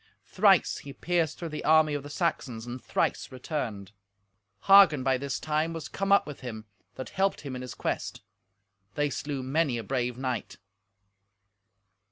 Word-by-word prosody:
Thrice - - +3
he 140 - -9
pierced 170 -1 -1
through 170 - -5
the 150 - -6
army 155 -1 +4
of 145 - -2
the 145 - -10
Saxons, 135 -8 -2
and 120 +1 -7
thrice - - -1
returned. 120 - -5 0.7
Hagen, 195 -9 +7
by 130 -1 +2
this 140 0 -3
time, 155 +2 -1
was 165 -2 -6
come 195 0 -3
up 200 - +5
with 150 -2 -8
him, 110 -4 -7 0.3
that 130 - -6
helped 195 +1 0
him 140 -3 -6
in 125 - -5
his 125 - -7
quest. - - -3 0.7
They 145 -1 0
slew 140 -2 -4
many 135 -1 0
a 115 - -4
brave 125 0 -2
knight. 130 -4 -4
140 Hz, 165 wpm, -28 LUFS, 125-160 Hz, 0.7 s, Hagen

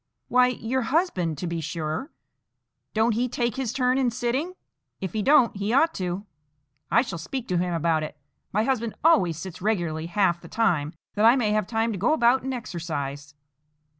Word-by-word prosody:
"Why, 250 0 +5
your 250 +1 -1
husband, 230 - 0
to 180 - -4
be 170 -1 -3
sure; 160 - -4 0.8
don't 220 +1 +3
he 245 +3 0
take 235 -1 -1
his 265 -4 -2
turn 255 +1 +1
in 255 -2 +2
sitting? 255 +9 -2 0.4
If 190 -3 -4
he 215 - 0
don't, 265 -1 +4
he 200 +3 -1
ought 320 +5 +4
to. 185 +2 -3 0.6
I 235 - +4
shall 190 -10 -6
speak 245 +9 -5
to 180 -1 +1
him 180 0 -1
about 165 -1 +1
it. 155 0 -6 0.3
My 210 +2 +1
husband 235 -3 -1
always 185 - +4
sits 180 +1 -8
regularly 170 -6 -1
half 175 -1 +1
the - - -11
time, 165 -9 +1 0.2
that 210 +1 +2
I 235 +3 +7
may 230 -5 +1
have 210 -2 +1
time 225 0 0
to 200 - -4
go 240 +11 +3
about 250 -3 +4
and 265 - -3
exercise." 145 - -5
215 Hz, 190 wpm, -25 LUFS, 170-250 Hz, 0.8 s, I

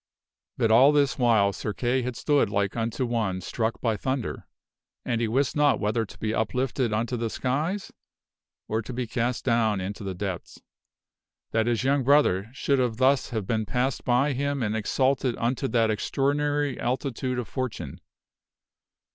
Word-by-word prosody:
But 115 - +2
all 130 +6 +7
this 145 -2 +2
while 110 -5 +4
Sir 105 - -4
Kay 125 +3 0
had 125 0 -4
stood 145 -6 +2
like 100 -1 0
unto 115 +2 -1
one 110 -6 -1
struck 110 +5 -2
by 115 -3 +1
thunder, 130 +3 -3 0.6
and 115 -1 0
he 115 - +1
wist 130 +4 0
not 145 -2 +3
whether 110 +1 0
to - - -13
be 110 0 -2
uplifted 125 +1 0
unto 115 +3 -1
the 115 -1 -2
skies 155 - -2 0.8
or 110 +1 -1
to 125 - -7
be 125 +1 -2
cast 120 +2 -2
down 115 -5 +2
into 100 +3 -5
the 95 -2 -4
depths, 95 -1 -5 0.9
that 115 0 +1
his 120 0 +1
young 135 +1 +2
brother 125 -8 +3
should 135 +1 0 0.2
thus 130 +1 +3
have 110 -4 -3
been 110 0 -1
passed 125 +4 -1
by 130 +3 +2
him 140 0 -1
and 105 0 -1
exalted 130 +3 +1
unto 125 +4 -1
that 115 -3 +2
extraordinary 145 +5 0
altitude 125 0 -2
of 125 -4 -3
fortune. 110 - -5
120 Hz, 165 wpm, -26 LUFS, 110-135 Hz, 0.9 s, all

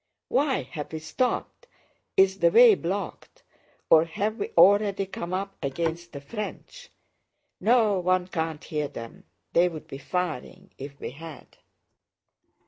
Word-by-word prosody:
"Why 275 -1 +1
have 150 -4 -7
we - - -2
stopped? 245 - -2 0.5
Is 190 0 +4
the 170 - +5
way 235 +4 +8
blocked? 190 +2 -5 0.4
Or 160 0 +6
have 205 +7 -2
we 415 - -3
already 200 0 +5
come 175 -2 -6
up 195 +1 -3
against 165 +5 -3
the 140 - -7
French?" 235 - -7 0.7
"No, 215 -2 +3
one 180 0 +1
can't 160 -4 -3
hear 150 -2 -2
them. 115 -5 -10 0.3
They'd 170 -3 +2
be 135 - -9
firing 175 -4 -4
if 140 +1 -9
we - - -5
had." 160 +3 -12
180 Hz, 135 wpm, -26 LUFS, 160-205 Hz, 0.7 s, way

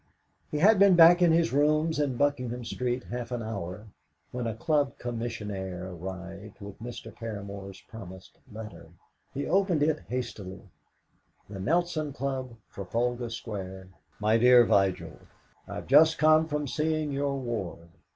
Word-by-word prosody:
He 150 - -3
had 200 +6 +5
been 200 -2 +7
back 170 +1 +8
at 175 - +6
his 165 -3 +2
rooms 155 +2 +2
in 140 -4 0
Buckingham 125 -4 -1
Street 125 +1 -2
half 120 0 -6
an 120 -2 -3
hour 105 -2 -6 0.5
when 125 -1 -3
a 110 - -3
club 145 +2 0
commissionaire 105 -6 -5
arrived 95 +3 -8
with 100 +1 -10
Mr. 115 -1 -8
Paramor's 100 -4 -7
promised 95 -5 -12
letter. 110 0 -9 0.4
He 140 - -4
opened 185 -5 +2
it 155 0 +1
hastily. 100 -7 -5 0.8
"THE 100 -1 -8
NELSON 155 - 0
CLUB, 130 -3 -4 0.2
"TRAFALGAR 120 +5 -2
SQUARE. 95 -5 -7 0.3
"MY 105 +2 +3
DEAR 125 0 +7
VIGIL, 95 -3 +1 0.5
"I've - - -6
just 160 0 +6
come 155 +1 +5
from 150 -1 -2
seeing 155 +1 -1
your 140 0 -1
ward. 100 -9 -5
120 Hz, 140 wpm, -28 LUFS, 100-150 Hz, 0.8 s, back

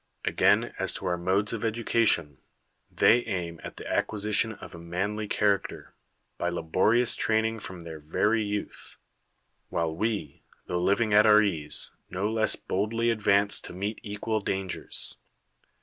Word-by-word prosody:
Again, - - +2
as - - 0
to - - -6
our 90 -1 +1
modes 95 +5 +1
of 115 - -4
education, 110 - +1 0.6
tlieij 120 +1 +4
aim 85 -3 -3
at - - -8
the - - -8
acquisition 105 +2 0
of 100 - -11
a 85 - -9
manly 95 +5 -3
character, 100 -1 -1 0.5
by 85 - 0
laborious 95 +8 +2
training 110 0 0
from 90 -4 -6
their 80 -2 -8
very 105 +9 +1
youth; 105 -1 -5 0.7
while 80 -1 -1
ICC, 110 +3 -3 0.2
tho 90 - -2
living 105 +4 +2
at 105 +1 +6
our 105 0 +7
ease, 80 -7 -1 0.2
no 95 +3 -2
less 110 -1 +3
boldly 115 +4 -1
advance 100 -2 +2
to - - -9
meet 100 +4 -4
equal 110 +1 -2
dangers. 95 -2 -2
105 Hz, 145 wpm, -27 LUFS, 90-110 Hz, 0.7 s, our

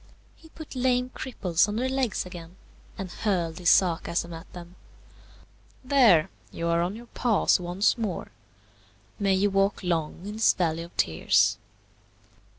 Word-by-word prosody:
He 320 - -18
put 315 -1 -11
lame 250 0 +1
cripples 185 -11 0
on 210 - -3
their 250 +3 0
legs 260 -7 -1
again, 175 -1 -10 0.4
and 190 -2 -6
hurled 175 -7 -1
this 180 -1 +2
sarcasm 170 -1 +2
at 165 +2 -11
them, 175 0 -11 1.1
"There, 245 - +4 0.2
you 170 0 -3
are 170 0 +2
on 180 +4 -2
your 235 +2 -10
paws 235 -5 +1
once 180 +7 0
more; 205 -6 -4 0.9
may 195 -2 +2
you 200 +2 +1
walk 195 +1 +1
long 170 0 -2
in 205 - -5
this 220 - +4
valley 165 -3 -1
of 170 +1 -11
tears!" 100 +6 +2
185 Hz, 150 wpm, -26 LUFS, 170-225 Hz, 1.1 s, There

